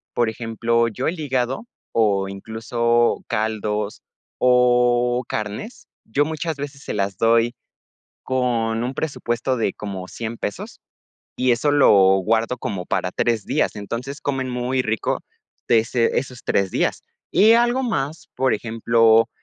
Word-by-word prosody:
Por 120 - +2
ejemplo, 115 +1 0
yo 120 +4 -3
el 165 +1 -2
hígado 135 - -2 0.2
o 100 -4 +2
incluso 115 +3 0
caldos 105 -1 -2 0.4
o 125 0 +3
carnes, 110 - -5 0.2
yo 140 +7 +1
muchas 160 0 -3
veces 140 -1 -7
se - - -4
las 100 -2 -1
doy 115 +1 +3 0.7
con 120 -3 0
un 130 +3 -3
presupuesto 130 -4 -2
de 110 -5 0
como 95 -3 -6
$100 115 +2 -6
pesos, 100 - -5 0.6
y 125 0 +2
eso 145 +5 +2
lo 145 -1 +5 0.3
guardo 115 +5 0
como 95 -6 -4
para 90 - -1
3 115 -1 0
días. - - 0
Entonces, 120 +8 -5
comen 135 -2 -2
muy 125 +1 -1
rico 110 -2 -1 0.5
de 115 - +6
ese 115 +1 +1
esos 125 -2 -9
3 100 -1 +1
días. - - -1 0.3
Y 220 +3 +6
algo 240 +3 +3
más, 155 - -2
por 130 +1 +2
ejemplo, 115 0 +3
120 Hz, 140 wpm, -22 LUFS, 110-130 Hz, 0.7 s, de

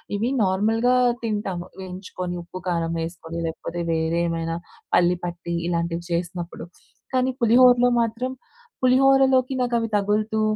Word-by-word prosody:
ఇవి 220 +4 0
నార్మల్‍గా 220 +6 +2 0.3
తింటాము, 205 -5 -2
వేయించుకొని 185 -1 -6
ఉప్పు 180 +2 -9
కారం 170 -2 0
వేసుకొని 165 0 -6
లేకపోతే 170 +1 -5
వేరే 160 +1 0
ఏమైనా 165 0 -2 0.4
పల్లి 175 0 +4
పట్టి 175 0 -5
ఇలాంటివి 170 0 -1
చేసినప్పుడు. 170 0 -3 0.5
కానీ 255 0 +2
పులిహోరలో 245 +1 +6
మాత్రం 230 +3 -2 0.5
పులిహోరలోకి 265 0 +4
నాకు 245 -1 -1
అవి 225 0 -2
తగులుతూ 210 +2 0
190 Hz, 120 wpm, -23 LUFS, 170-240 Hz, 0.5 s, పులిహోరలో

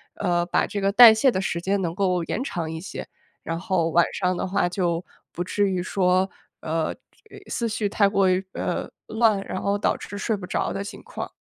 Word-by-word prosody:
呃， 175 -1 0
把 175 - +1
这 200 - -4
个 195 0 +2
代 230 +1 +10
谢 240 +4 +3
的 185 - -1
时 170 -3 -2
间 195 +2 0
能 170 -2 -2
够 180 -3 +1
延 250 - -2
长 170 - -3
一 160 0 -5
些。 195 - -7 0.4
然 165 - -3
后 180 -3 0
晚 170 +1 +5
上 180 -1 0
的 - - -2
话 190 -1 +1
就 175 -1 -1 0.3
不 175 - -3
至 200 +2 +1
于 185 -1 -1
说， 185 0 +2 0.3
呃， 160 0 -1 0.6
思 235 -1 -1
绪 210 -1 -1
太 200 0 +3
过 195 -1 +3
于， 185 +1 +1
呃， - - -3 0.2
乱， 220 -2 +2
然 185 - -4
后 200 0 +1
导 205 - +1
致 205 - -8
睡 220 +1 -1
不 195 - -7
着 - - -1
的 195 - -3
情 200 - -9
况。 - - -7
190 Hz, 230 characters per minute, -24 LUFS, 175-205 Hz, 0.6 s, 代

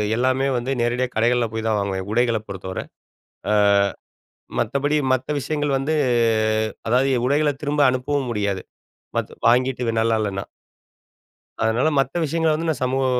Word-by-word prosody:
எல்லாமே 130 +3 +1
வந்து, 120 +2 -3
நேரடியா 120 +2 0
கடைகள்ல 120 +1 +2
போய் 110 0 -3
தான் 110 -1 +1
வாங்குவேன். 95 -1 -3
உடைகள 115 0 +2
பொறுத்தவரை, 95 -1 -5 0.7
அ - - +3 1.1
மத்தபடி 140 +6 0 0.2
மத்த 130 -1 -1
விஷயங்கள் 145 -1 -1
வந்து, 140 +4 -1 0.9
அதாவது 125 +4 +3
எ - - 0
உடைகள்ல 145 +2 +2
திரும்ப 145 0 +1
அனுப்பவும் 130 +1 -1
முடியாது, 100 -3 -1 0.6
பத் - - -2 0.2
வாங்கிட்டு 125 +1 +2
இது 115 - 0
நல்லா 115 0 +2
இல்லன்னா. 100 -2 -3 1.2
அதுனால, 115 +6 +2
மத்த 135 +4 0
விஷயங்கள 160 +1 +1
வந்து, 165 +1 -2
நான் 150 -5 -2
சமூக 130 +1 0
125 Hz, 140 wpm, -22 LUFS, 110-140 Hz, 1.2 s, அ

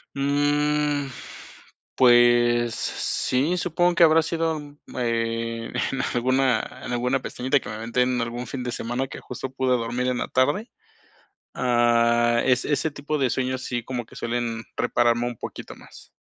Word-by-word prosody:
Mm, 145 +1 +1 0.9
pues 120 -1 +5
sí, 145 +8 -1
supongo 175 +1 +1
que 170 - +5
habrá 165 0 +6
sido, 160 0 -1
um, 145 -1 -11 0.2
eh, 115 -1 -2 0.2
en 135 - -2
alguna 130 -1 +1
en - - -5
alguna 125 +2 0
pestañita 130 +3 0
que - - -9
me 105 - -5
meten 125 +3 0
en 125 - 0
algún 120 +1 -4
fin 125 +1 -5
de 125 - -3
semana, 120 +3 -3
que - - -8
justo 125 +1 -7
pude 130 -1 -1
dormir 120 +2 -2
en 125 -1 0
la - - -2
tarde. 145 - +1 0.8
Ah, 120 -1 +3
es 125 -1 +2
ese 150 +1 0
tipo 145 +1 -3
de 135 -3 +1
sueños, 130 +1 -2
sí, 120 -2 -3
como 120 -1 -4
que - - -17
suelen 115 -1 -3
repararme 120 0 +1
un 120 -3 -6
poquito - - -8
más. - - -16
125 Hz, 160 wpm, -24 LUFS, 120-140 Hz, 0.9 s, habrá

